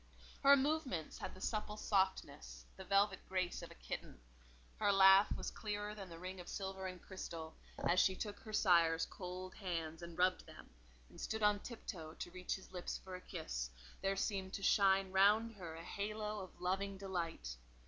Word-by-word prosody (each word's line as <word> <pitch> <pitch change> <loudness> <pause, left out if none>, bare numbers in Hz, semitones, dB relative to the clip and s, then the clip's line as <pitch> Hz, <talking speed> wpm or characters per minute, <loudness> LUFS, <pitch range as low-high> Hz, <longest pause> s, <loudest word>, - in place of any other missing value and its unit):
Her 280 0 +8
movements 275 - -1
had - - -5
the 185 - -12
supple 210 0 -2
softness, 65 - 0
the 190 - -8
velvet 195 0 +3
grace 185 -2 -1
of - - -8
a - - -12
kitten; - - -6 0.6
her 205 -1 +3
laugh 195 +1 +8
was - - -3
clearer 210 -1 -3
than 195 -3 -8
the 165 - -8
ring 185 +2 -6
of 175 - -8
silver 190 -1 -4
and 185 -1 -6
crystal; 165 -4 -7 0.3
as 180 - +4
she 190 - +4
took 205 +1 -4
her 215 - -9
sire's 170 -6 +4
cold 185 0 -6
hands 165 -4 -3
and 170 -1 -8
rubbed 185 +1 +2
them, - - -12 0.4
and - - -10
stood 220 -1 -2
on 210 0 +5
tiptoe 170 -9 -7
to 175 - -6
reach 180 0 -2
his 190 - -11
lips 180 -1 -3
for 190 - -10
a 180 - -6
kiss, - - -4 0.3
there 195 0 +1
seemed 195 -1 -1
to 195 - -4
shine 195 -2 +4
round 210 +4 +5
her 170 -4 -6
a 165 - -8
halo 210 +2 -3
of 185 -2 -9
loving 195 +2 -1
delight. 170 - -3
190 Hz, 185 wpm, -38 LUFS, 175-205 Hz, 0.6 s, Her